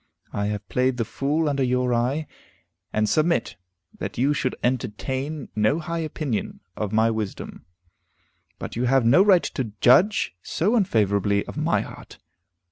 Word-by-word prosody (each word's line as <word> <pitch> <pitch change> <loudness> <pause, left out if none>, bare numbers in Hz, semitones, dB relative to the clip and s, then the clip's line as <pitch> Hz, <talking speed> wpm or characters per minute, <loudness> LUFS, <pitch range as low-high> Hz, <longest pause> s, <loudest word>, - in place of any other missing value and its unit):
I 100 0 -1
have 105 0 -4
played 125 0 +1
the 115 - -1
fool 150 +7 -1
under 140 -2 0
your 125 -1 +1
eye, 130 +6 0 0.7
and 110 0 +1
submit 155 -2 +1 0.4
that 100 +2 -5
you 135 +5 +2
should 130 -3 -1
entertain 130 +4 -2
no 110 +8 +2
high 170 0 -4
opinion 150 -7 -3 0.2
of 105 -2 -3
my 110 +1 +3
wisdom. 110 -7 -5 0.9
But - - -7
you 120 +2 0
have 130 -1 +3
no 135 +11 +6
right 195 -3 +5
to 115 -6 -4
judge 175 - +4
so 200 - 0
unfavorably 100 - +1
of - - -9
my - - +1
heart. - - -11
125 Hz, 150 wpm, -24 LUFS, 110-155 Hz, 0.9 s, no